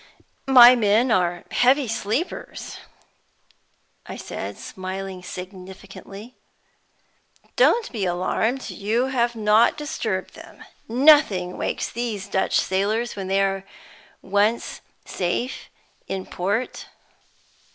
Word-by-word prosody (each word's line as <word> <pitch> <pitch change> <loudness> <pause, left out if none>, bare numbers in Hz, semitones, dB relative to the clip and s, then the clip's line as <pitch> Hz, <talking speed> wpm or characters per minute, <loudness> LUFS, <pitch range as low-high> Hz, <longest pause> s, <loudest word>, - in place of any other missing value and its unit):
"My 250 -2 +9
men 225 +2 +2
are 175 -3 +1
heavy 260 +2 +3
sleepers," 225 - -4 1.3
I - - -7
said, - - -6
smiling 190 0 -7
significantly. 190 +4 -10 1.2
"Don't 475 -2 +3
be 210 -6 -2
alarmed; 200 +8 -1
you 230 +6 -1
have 240 -2 0
not 215 +3 +3
disturbed 300 0 -4
them. - - -13 0.2
Nothing 230 -8 +4
wakes - - -2
these 220 -5 -4
Dutch 190 - +1
sailors 215 +5 -1
when 195 -2 -5
they 195 +1 +2
are 195 -1 -1 0.6
once 205 +4 0 0.2
safe 195 +8 -3 0.4
in 190 -1 -4
port." 205 +7 -3
210 Hz, 100 wpm, -23 LUFS, 190-240 Hz, 1.3 s, My